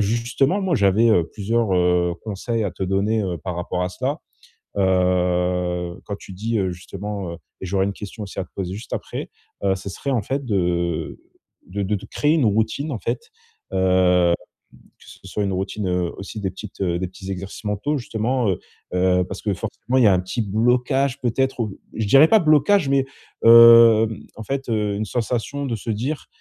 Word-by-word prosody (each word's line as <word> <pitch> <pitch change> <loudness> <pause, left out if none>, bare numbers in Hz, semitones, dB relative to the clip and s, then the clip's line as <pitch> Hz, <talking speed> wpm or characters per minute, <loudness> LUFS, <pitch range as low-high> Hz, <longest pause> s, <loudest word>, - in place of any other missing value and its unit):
justement, 120 - +1
moi, 185 -3 +1
j'avais, 100 +1 +4
heu, 90 -6 +4
plusieurs, 110 0 0
heu, 90 -1 +2
conseils 110 +2 -2
à 100 - -1
te 90 - -7
donner, 100 +4 +1
heu, 90 -3 -2
par 90 +2 -5
rapport 90 +1 -2
à 90 - -1
cela. 130 - -3 0.6
Heu, 90 -2 +1
quand 100 - -5
tu - - -11
dis, 110 +5 -2
heu, 95 -2 0
justement, 95 +1 -6
heu 85 - -7 0.2
et - - -5
j'aurais 95 +1 +1
une 100 - -1
question 105 +2 -8
aussi 95 - -10
à - - -3
te 90 - -22
poser 95 -2 -4
juste 110 - -9
après. - - -5 0.3
Heu, 95 -1 +3
ce 95 - -7
serait, 140 - -4
en 125 -5 +1
fait, 135 +6 -3
de 85 -6 -1 0.5
de 100 +3 -4
de 100 +2 0
te 95 - -9
créer 150 +1 +1
une 155 -5 +2
routine, 110 +8 0
en 115 - -3
fait, 465 -1 -4 0.4
heu 90 -2 +3 0.6
que - - -20
ce - - -14
soit 105 +2 -2
une 100 - -1
routine, 95 +1 -3
heu, 90 -1 -1
aussi 100 +2 -7
des 95 -2 -2
petites, 95 +2 -11
heu, 85 -2 0
des 95 - -3
petits 95 +1 -9
exercices 95 +3 -6
mentaux, 105 +9 -1
justement. 120 0 -1
Heu 95 - -1 0.4
heu, 90 0 +3
parce 95 +2 -7
que 105 - 0
forcément, 110 +5 -3
il 125 - +5
y - - +7
a 100 - +5
un 90 - +2
petit 95 +6 -3
blocage, 125 +6 +1
peut-être, 130 +2 0
ou 105 -4 -3
je 110 -2 -2
dirais 135 +9 +7
pas 220 - +6
blocage, 155 +2 +4
mais, 135 -1 +2 0.4
heu, 115 -1 +9 0.3
en 110 - -7
fait, 135 +2 -3
heu, 105 -2 0
une 110 - -2
sensation 120 +5 -2
de 120 - -2
se 110 +2 -5
dire: 125 +8 -3
105 Hz, 200 wpm, -22 LUFS, 95-120 Hz, 0.6 s, heu